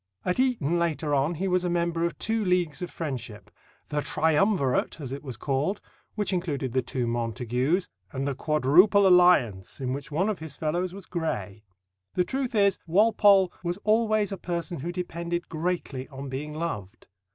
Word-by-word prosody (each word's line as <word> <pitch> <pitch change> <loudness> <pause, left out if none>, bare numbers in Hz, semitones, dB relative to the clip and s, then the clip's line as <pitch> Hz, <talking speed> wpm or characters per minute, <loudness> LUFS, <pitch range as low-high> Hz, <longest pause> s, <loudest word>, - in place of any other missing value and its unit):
At 180 +5 0
Eton 200 - +1
later 160 -3 -1
on 145 +5 +1
he 190 +5 -2
was 180 -1 +1
a 180 - 0
member 170 -1 0
of 170 - -3
two 225 0 -1
leagues 180 -6 +1
of 180 - -3
friendship 140 -9 -6 0.4
the 150 0 -1
"Triumvirate," 160 -2 +1
as 135 -4 -6
it 140 +1 -5
was 130 -6 -7
called, 145 - -1 0.4
which 210 -2 0
included 150 -8 -2
the 130 +2 +1
two 125 0 -3
Montagus, 125 - -1 0.2
and 135 +1 -3
the 140 - 0
"Quadruple 155 +9 +4
Alliance," 175 - +4
in 130 -1 -2
which 140 +2 -6
one 175 +7 +1
of 215 -4 -2
his 160 -2 -8
fellows 175 +4 -1
was 195 0 -9
Gray. 110 - -4 0.5
The 180 - +3
truth 260 +2 -2
is, 200 -2 +3
Walpole 200 0 +5
was 175 +1 -2
always 215 -1 +2
a 195 - -3
person 170 -1 -3
who 170 +6 -3
depended 175 -1 -4
greatly 160 -5 -3
on 135 -1 -8
being 140 +3 -5
loved. 120 - -5
170 Hz, 175 wpm, -27 LUFS, 135-185 Hz, 0.5 s, Walpole